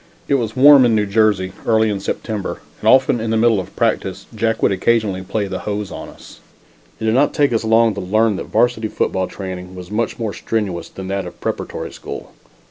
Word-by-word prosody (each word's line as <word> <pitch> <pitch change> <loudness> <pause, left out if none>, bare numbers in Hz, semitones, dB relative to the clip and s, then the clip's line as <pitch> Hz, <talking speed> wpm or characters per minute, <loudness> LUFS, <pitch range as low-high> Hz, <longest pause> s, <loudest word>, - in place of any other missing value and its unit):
It - - +1
was 115 -5 0
warm 140 +1 +8
in 120 -2 +3
New 105 -1 +2
Jersey 100 -3 +1
early 110 -1 +2
in 100 - -2
September, 105 0 -4 0.2
and - - +2
often 130 -2 +4
in 110 0 -3
the 110 - +1
middle 115 -2 +3
of 95 - -8
practice - - -1
Jack 115 -1 -1
would - - +4
occasionally 105 -1 +1
play 100 +3 -2
the 95 -1 -4
hose 105 -2 -4
on - - -7
us. - - -15 0.6
It 110 - -3
did 110 - +2
not 135 +4 +2
take 145 -4 +2
us 115 - 0
long 115 0 +4
to 100 - -5
learn 110 +3 +2
that - - -5
varsity 120 -2 +1
football 95 -3 -1
training 95 -1 -7
was 90 +1 -9
much 115 +2 -1
more 110 -3 -3
strenuous 95 -7 -3
than 95 -1 -8
that 95 -2 -2
of - - -8
the - - -31
preparatory - - -4
school. - - -8
110 Hz, 215 wpm, -19 LUFS, 95-115 Hz, 0.6 s, warm